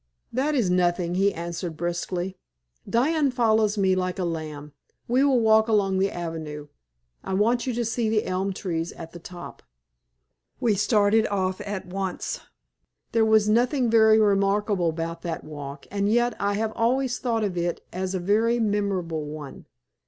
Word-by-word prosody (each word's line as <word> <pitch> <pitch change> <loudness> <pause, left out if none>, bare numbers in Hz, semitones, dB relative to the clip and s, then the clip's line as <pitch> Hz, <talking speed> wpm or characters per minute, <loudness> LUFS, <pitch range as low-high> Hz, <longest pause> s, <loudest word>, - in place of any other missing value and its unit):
"That 280 +5 +1
is 220 -9 +2
nothing," 175 -1 +1
he 195 +2 +3
answered, 170 -1 -5
briskly. 175 +2 -3 0.5
"Diana 285 +5 +2
follows 220 -4 +2
me 190 -2 +3
like 185 -1 -1
a 185 - -1
lamb. 155 -3 -5 0.3
We 255 +3 +3
will 270 -3 +4
walk 220 0 +4
along 195 -4 +2
the 195 +1 +2
avenue. 160 -4 -6 0.5
I 190 - -2
want 235 +5 +2
you 250 - 0
to 240 0 -1
see 225 0 0
the 215 -1 +1
elm 185 +2 -1
trees 170 -3 -3
at 165 -1 -9
the 175 - -10
top." 175 +1 -10 1.0
We 225 - +2
started 210 +1 +3
off 190 -2 -1
at 205 -2 -5
once. 190 0 -4 0.7
There 230 -2 +3
was 220 -1 +4
nothing 240 +2 +2
very 220 -1 +6
remarkable 200 -3 +2
about 165 +1 -4
that 170 -2 -4
walk, 145 -2 -8
and 200 +1 0
yet 240 +1 +2
I 200 0 0
have 220 +1 -1
always 250 +2 +1
thought 230 -3 0
of 195 -3 -1
it 175 0 -2
as 185 +1 -2
a - - -1
very 220 +6 +2
memorable 195 -7 -1
one. 150 -2 -9
200 Hz, 165 wpm, -25 LUFS, 175-220 Hz, 1.0 s, very